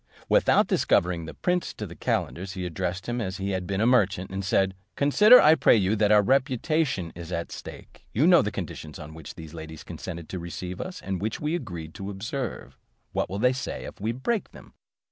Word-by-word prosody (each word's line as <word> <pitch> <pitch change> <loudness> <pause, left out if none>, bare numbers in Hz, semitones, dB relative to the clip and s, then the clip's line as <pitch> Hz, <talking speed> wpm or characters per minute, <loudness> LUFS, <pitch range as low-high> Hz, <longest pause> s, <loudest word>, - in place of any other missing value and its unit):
Without - - +4
discovering 85 -2 +1
the 80 - -8
prince 180 0 -1
to - - -5
the - - -9
calenders, 95 +2 -2
he 95 -2 -4
addressed 90 +2 -3
him 120 0 -1
as 95 -3 -3
if 95 - -6
he 100 - -1
had 95 -2 -2
been 95 +1 -1
a - - +3
merchant, 100 -7 +2
and 95 +1 -3
said, 95 +1 +2 0.2
"Consider, 210 - +7
I 155 - +7
pray 160 - +5
you, 100 0 +2
that 105 -1 +2
our 105 -1 +6
reputation 130 - +1
is 85 +1 -9
at 85 -1 -3
stake. - - -10
You 135 +8 +2
know 175 -1 +7
the 105 - -1
conditions 80 -5 -6
on 75 +1 -9
which 80 -2 -10
these 80 -1 -10
ladies 80 -1 -8
consented 85 -3 -7
to 95 - -4
receive 90 +1 -6
us, 185 0 -7
and 95 -2 -3
which 110 +1 -2
we 150 +2 -1
agreed 90 - -5
to 100 -1 -6
observe; 115 +5 -5 0.4
what - - -1
will 100 - -4
they 125 +5 +3
say 130 - -5
of - - -7
us - - -34
if - - -15
we 110 +2 0
break 190 - -2
them? - - -14
100 Hz, 225 wpm, -26 LUFS, 90-125 Hz, 0.4 s, Consider